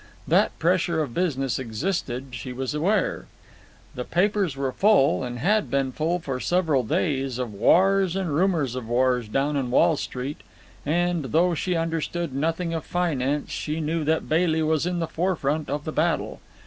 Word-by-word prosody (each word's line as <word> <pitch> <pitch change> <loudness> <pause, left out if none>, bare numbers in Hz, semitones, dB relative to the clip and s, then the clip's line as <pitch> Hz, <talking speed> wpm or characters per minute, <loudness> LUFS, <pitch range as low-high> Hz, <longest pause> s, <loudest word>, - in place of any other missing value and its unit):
That - - +2
pressure 170 -2 +1
of 130 -6 -7
business 135 -8 -1
existed, 130 - -3
she 125 +1 -6
was 130 +2 -3
aware. 165 - 0 0.7
The 125 - -4
papers 190 0 +1
were 135 -1 -1
full, 190 - +3
and 120 -1 -4
had 205 - +1
been 135 -1 0
full 160 +6 0
for 135 -7 -4
several 160 -4 +1
days, 135 -2 -1
of 125 -4 -4
wars 190 - +3
and 185 -6 -1
rumours 160 -6 +1
of 125 -3 -5
wars 125 -1 +2
down 135 +7 0
in 135 -3 -1
Wall 165 +6 +4
Street; 130 +3 -5 0.5
and, 175 0 +1
though 170 +7 +2
she 180 +3 -1
understood 165 -1 -2
nothing 165 +4 -1
of 160 -2 -3
finance, 150 -5 -1
she 155 +1 -3
knew 160 +1 -1
that 160 +1 0
Bailey 160 0 +2
was 155 +1 +1
in 180 0 -1
the 170 - 0
forefront 160 -3 -1
of 145 +1 -3
the 155 - -3
battle. 165 +2 0
155 Hz, 170 wpm, -25 LUFS, 135-175 Hz, 0.7 s, Wall